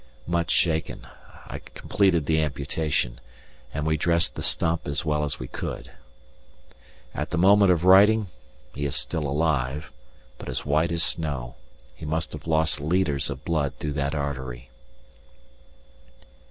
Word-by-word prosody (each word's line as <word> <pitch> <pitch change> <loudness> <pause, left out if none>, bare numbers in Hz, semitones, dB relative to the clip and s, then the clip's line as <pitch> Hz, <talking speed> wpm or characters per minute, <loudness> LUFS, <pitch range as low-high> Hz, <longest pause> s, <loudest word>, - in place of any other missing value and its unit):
Much 85 -1 -1
shaken, 80 -2 0 0.4
I - - -7
completed 95 -7 0
the 80 +1 +2
amputation, 70 -3 -2 0.5
and 75 +1 -3
we 80 0 +1
dressed 85 +1 +2
the - - -6
stump 85 0 0
as 70 +2 -1
well 75 -1 +1
as 75 - -2
we 65 - -5
could. - - -6 1.2
At 75 - -3
the 90 - -2
moment 100 +2 +6
of 85 -2 +1
writing 105 +4 +7 0.5
he 75 - -5
is 70 - -2
still 75 -3 0
alive, 75 -1 -1 0.5
but - - -7
as 65 - -3
white 75 +3 +2
as 85 0 +3
snow; 70 -7 -2 0.4
he 75 - -14
must 80 +1 -2
have - - -8
lost 80 -2 +2
litres 75 -3 +1
of 70 0 -7
blood 75 -5 0
through 75 -1 -4
that 70 +1 -1
artery. 65 -4 -5
75 Hz, 145 wpm, -25 LUFS, 70-85 Hz, 1.2 s, writing